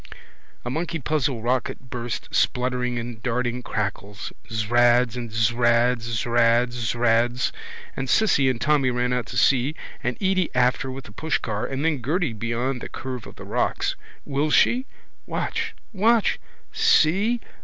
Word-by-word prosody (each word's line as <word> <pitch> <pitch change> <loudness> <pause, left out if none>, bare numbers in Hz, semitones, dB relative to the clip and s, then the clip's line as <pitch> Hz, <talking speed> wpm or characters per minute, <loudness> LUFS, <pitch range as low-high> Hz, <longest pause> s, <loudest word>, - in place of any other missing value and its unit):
A 120 - -2
monkey 165 +3 -2
puzzle 135 -5 -1
rocket 125 +1 -2
burst, 120 -1 -4
spluttering 125 -1 0
in 115 -1 -5
darting 125 +1 -1
crackles. 105 -3 -4 0.2
Zrads 120 +2 +3
and 120 -2 -5
zrads, 115 +2 +2 0.2
zrads, 120 +1 +3
zrads. 120 +1 +1 0.4
And 135 -1 -4
Cissy 140 - +4
and 125 -3 -1
Tommy 145 -2 +2
and 125 - -2
Jacky 125 - +1
ran 125 0 0
out 125 -1 -1
to 125 - -5
see 135 +4 +3 0.3
and 125 0 -1
Edy 190 -2 +1
after 125 +2 +2
with 130 +1 -6
the - - -11
pushcar 110 -5 -2
and 135 +3 -2
then 150 -5 +1
Gerty 155 +1 0
beyond 120 +3 -2
the - - -6
curve 130 -3 -6
of - - -12
the - - -10
rocks. - - 0 0.3
Will 145 +2 0
she? 250 - +3 0.4
Watch! - - -2 0.2
Watch! 220 +2 +3 0.3
See! 235 - +3
125 Hz, 150 wpm, -24 LUFS, 120-140 Hz, 0.4 s, Cissy